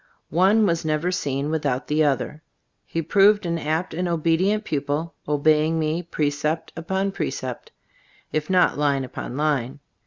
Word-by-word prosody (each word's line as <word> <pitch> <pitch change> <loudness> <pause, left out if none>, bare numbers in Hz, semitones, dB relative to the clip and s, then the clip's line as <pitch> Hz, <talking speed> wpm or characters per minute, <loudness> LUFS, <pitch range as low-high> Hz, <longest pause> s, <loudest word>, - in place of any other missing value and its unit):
One 195 +7 +4
was 170 -3 +1
never 155 +3 0
seen 145 -4 -2
without 140 -5 -1
the 155 +1 +2
other. 145 +2 -1 0.5
He 165 - -2
proved 200 +4 +4
an 170 -1 -1
apt 160 +4 -2
and 180 +2 -1
obedient 170 +6 +1
pupil, 150 0 -2
obeying 155 +2 +2
me 160 +2 0
precept 155 -1 -2
upon 190 +4 -1
precept, 130 -9 -4 0.6
if 155 0 -2
not 180 -5 +3
line 140 -2 +2
upon 125 0 -6
line. 145 -3 0
155 Hz, 145 wpm, -23 LUFS, 145-175 Hz, 0.6 s, One